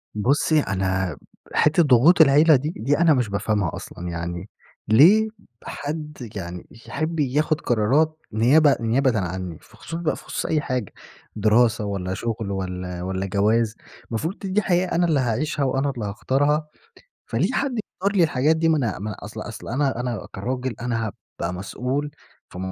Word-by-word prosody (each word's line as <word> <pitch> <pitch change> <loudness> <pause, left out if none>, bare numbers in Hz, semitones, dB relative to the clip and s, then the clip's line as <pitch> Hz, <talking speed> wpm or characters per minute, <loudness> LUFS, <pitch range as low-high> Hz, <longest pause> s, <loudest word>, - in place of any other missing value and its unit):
بُصّي 140 +8 +2
أنا 95 -6 -1 0.4
حتّة 155 +3 +4
ضغوط 145 +5 +6
العيلة 150 +2 +6
دي، 145 +4 -1
دي 140 +6 +1
أنا 165 -2 +5
مش 125 -5 0
بافهمها 100 -3 -1
أصلًا. 90 0 -7
يعني 85 +3 -5 0.4
ليه 175 - +6 0.4
حد 150 -4 -6
يعني 90 -2 -6 0.2
يحب 160 +2 -3
ياخد 150 +3 +1
قرارات 140 +8 +2 0.2
نيابة 135 +6 +5
نيابةً 120 0 +2
عنّي؟ 90 -2 -4
في - - -20
خصوص - - -7
ب 170 -2 0
خصوص - - -5
أي 155 -1 +1
حاجة 125 -8 -3 0.4
دراسة، 110 +1 +3
والّا 95 -2 -3
شغل 110 0 -3
والّا 90 -2 -4
والّا 95 +1 -2
جواز. 105 +3 +1 0.3
المفروض 160 - -3
د 200 - -5
دي 210 - +3
حياة 180 -1 +1
أنا 175 +1 +3
اللي 155 -5 +2
هاعيشها 140 +5 -1
وأنا 135 +2 0
اللي 120 -6 -4
هاختارها. 145 +9 0 0.6
فليه - - 0
حد 275 -2 -1
يختار 200 +2 -3
لي 180 - +5
الحاجات 150 +1 +2
دي؟ 165 0 +1
ما 160 - +4
أنا 120 -9 -1
م 105 - -5
أصل 105 - -7
أصل - - -8
أنا 130 -1 0
أنا 120 -3 -3
كراجل 125 +4 -3
أنا 115 -2 -1
هابقى 90 -3 -6
مسؤول 125 +10 -3 0.4
في - - -10
125 Hz, 160 wpm, -23 LUFS, 100-150 Hz, 0.6 s, ضغوط